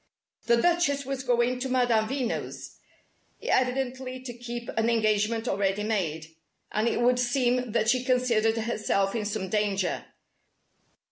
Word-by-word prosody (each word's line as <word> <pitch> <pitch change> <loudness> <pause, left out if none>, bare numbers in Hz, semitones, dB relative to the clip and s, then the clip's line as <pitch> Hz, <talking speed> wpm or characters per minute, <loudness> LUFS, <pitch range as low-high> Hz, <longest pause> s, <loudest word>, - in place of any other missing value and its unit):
The 235 0 +5
Duchess 285 -4 +2
was 270 0 -3
going 250 0 +1
to 265 +1 -3
Madame 245 -4 +2
Veno's, 265 -3 -4 0.6
evidently 255 0 0
to 250 -2 -7
keep 240 0 -7
an 225 +1 0
engagement 220 0 +1
already 195 0 0
made, 160 -7 -2 0.3
and 215 +2 +1
it 235 - 0
would 245 +1 +3
seem 245 -1 +1
that 225 - +1
she 250 +2 +3
considered 240 -4 +2
herself 215 -3 0
in 225 -3 -2
some 205 -2 -3
danger. 200 -2 -1
235 Hz, 135 wpm, -27 LUFS, 215-255 Hz, 0.6 s, The